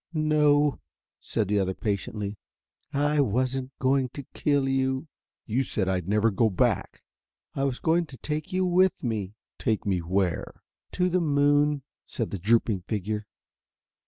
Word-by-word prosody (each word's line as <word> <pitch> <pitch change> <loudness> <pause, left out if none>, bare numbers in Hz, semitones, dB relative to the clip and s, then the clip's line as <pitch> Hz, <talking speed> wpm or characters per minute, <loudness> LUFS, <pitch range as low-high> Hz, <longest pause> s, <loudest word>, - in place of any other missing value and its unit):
"No," 150 -2 +3 0.4
said 110 -4 -1
the 105 +1 +2
other 95 -1 0
patiently. 105 0 -3 0.5
"I 145 +1 +1
wasn't 130 +2 0
going 130 -1 +2
to 140 - -7
kill 145 -2 +1
you." 130 +2 0 0.4
"You 120 +4 0
said 100 -6 -1
I'd 90 -2 -1
never 105 +2 +3
go 110 +3 +2
back." 95 - 0 0.5
"I 135 - 0
was 130 -3 -1
going 165 +1 +1
to 130 - -11
take 150 +2 -4
you 185 0 +1
with 185 +1 +3
me." 105 -4 -2 0.2
"Take 110 -2 0
me 95 -3 +1
where?" 90 0 -2 0.3
"To 180 0 +2
the 180 0 +1
moon," 145 -1 +3 0.2
said 115 - -3
the 100 - -3
drooping 110 0 +2
figure. 105 0 -2
130 Hz, 150 wpm, -27 LUFS, 105-145 Hz, 0.5 s, No